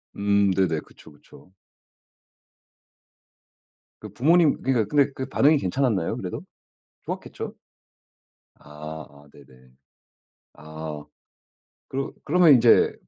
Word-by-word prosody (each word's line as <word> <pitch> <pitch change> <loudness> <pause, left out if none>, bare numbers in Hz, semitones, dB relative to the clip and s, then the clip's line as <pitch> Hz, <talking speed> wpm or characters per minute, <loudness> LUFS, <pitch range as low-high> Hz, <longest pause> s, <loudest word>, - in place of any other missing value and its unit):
음 100 -1 +2
네네. 90 -4 +1
그쵸, - - -18
그쵸. 75 +5 -19 2.5
그 105 - -9
부모님 160 +6 +3
그니까 125 -5 +1
근데 140 +5 +2
그 130 0 -5
반응이 145 +3 +3
괜찮았나요, 105 -4 -1
그래도? - - -6 0.6
좋았겠죠? - - -6 1.0
아 75 +1 -10
아 70 0 -19
네네. 65 -2 -19 0.9
아 75 0 -8 0.8
그러 135 +1 -4
그러면 165 0 +5
인제 120 -2 +5
100 Hz, 200 characters per minute, -24 LUFS, -, 2.5 s, 그러면